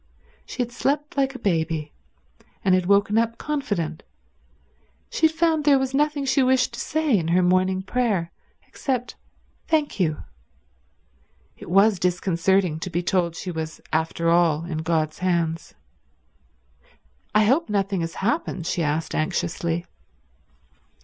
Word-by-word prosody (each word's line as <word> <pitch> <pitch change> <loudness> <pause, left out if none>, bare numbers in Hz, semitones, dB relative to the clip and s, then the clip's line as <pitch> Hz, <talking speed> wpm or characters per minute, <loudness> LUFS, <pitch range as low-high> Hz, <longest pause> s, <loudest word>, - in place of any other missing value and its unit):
She 250 - -2
had 240 - -8
slept 290 +4 -1
like 270 -1 0
a 250 - -10
baby, 160 -4 0 0.7
and 190 - +4
had 185 -1 +2
woken 205 +2 +3
up 230 0 -1
confident; 205 - -3 1.1
she 320 - +4
had 315 - -8
found 320 -2 +2
there 285 -1 +5
was 265 0 -2
nothing 295 0 +1
she 270 +1 +2
wished 260 0 +2
to - - -7
say 310 -5 +1
in 170 -5 0
her 180 +2 +3
morning 185 +1 +2
prayer, 200 -6 0 0.4
except 255 -3 -3 0.5
Thank 310 -7 0
you. 155 -5 0 1.3
It - - -11
was 195 +2 +4
disconcerting 180 -1 +1
to 185 - -5
be 175 0 -2
told 175 -2 0
she 180 - -5
was 160 -1 -5
after 160 +1 0
all 170 -2 +3
in 165 -3 -4
God's 160 -1 -1
hands. 170 -3 -1 1.6
"I 215 - +6
hope 265 +5 +2
nothing 195 -2 0
has 165 0 -4
happened?" 200 - -2
she 170 - -1
asked 155 +1 -1
anxiously. 170 +1 -1
185 Hz, 140 wpm, -24 LUFS, 165-255 Hz, 1.6 s, I